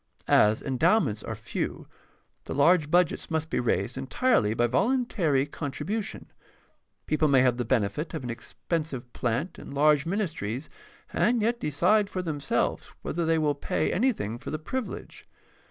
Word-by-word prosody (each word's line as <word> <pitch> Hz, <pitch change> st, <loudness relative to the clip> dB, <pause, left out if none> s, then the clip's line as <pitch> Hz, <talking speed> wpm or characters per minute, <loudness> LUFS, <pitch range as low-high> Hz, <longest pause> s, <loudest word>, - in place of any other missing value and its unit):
As 105 Hz, +1 st, +4 dB
endowments 135 Hz, -, +2 dB
are -, -, -5 dB
few, -, -, -4 dB, 0.6 s
the -, -, -5 dB
large 155 Hz, +2 st, +4 dB
budgets 175 Hz, 0 st, +2 dB
must 160 Hz, 0 st, -2 dB
be -, -, +1 dB
raised 120 Hz, +1 st, 0 dB
entirely 135 Hz, -, +1 dB
by 120 Hz, -, +3 dB
voluntary 180 Hz, -, +1 dB
con 145 Hz, -1 st, -5 dB
tribution. 210 Hz, +8 st, -4 dB, 0.8 s
People 155 Hz, 0 st, +2 dB
may 135 Hz, -3 st, +5 dB
have 125 Hz, -2 st, +3 dB
the 120 Hz, -, -2 dB
benefit 115 Hz, +5 st, 0 dB
of -, -, -4 dB
an 120 Hz, -, -3 dB
expensive 130 Hz, +1 st, -4 dB
plant 125 Hz, +9 st, -2 dB
and -, -, -10 dB
large 150 Hz, +1 st, +4 dB
ministries, 160 Hz, -, -3 dB, 0.4 s
and 240 Hz, 0 st, +2 dB
yet 235 Hz, +2 st, +1 dB
decide 185 Hz, +8 st, +2 dB
for 185 Hz, -2 st, -3 dB
themselves 145 Hz, -4 st, -1 dB, 0.2 s
whether 170 Hz, +1 st, -2 dB
they 165 Hz, 0 st, +3 dB
will 150 Hz, -2 st, +2 dB
pay 85 Hz, -, -1 dB
anythmg 185 Hz, -, 0 dB
for -, -, -6 dB
the 155 Hz, -, -2 dB
privilege. 235 Hz, +10 st, -6 dB
150 Hz, 155 wpm, -27 LUFS, 125-180 Hz, 0.8 s, may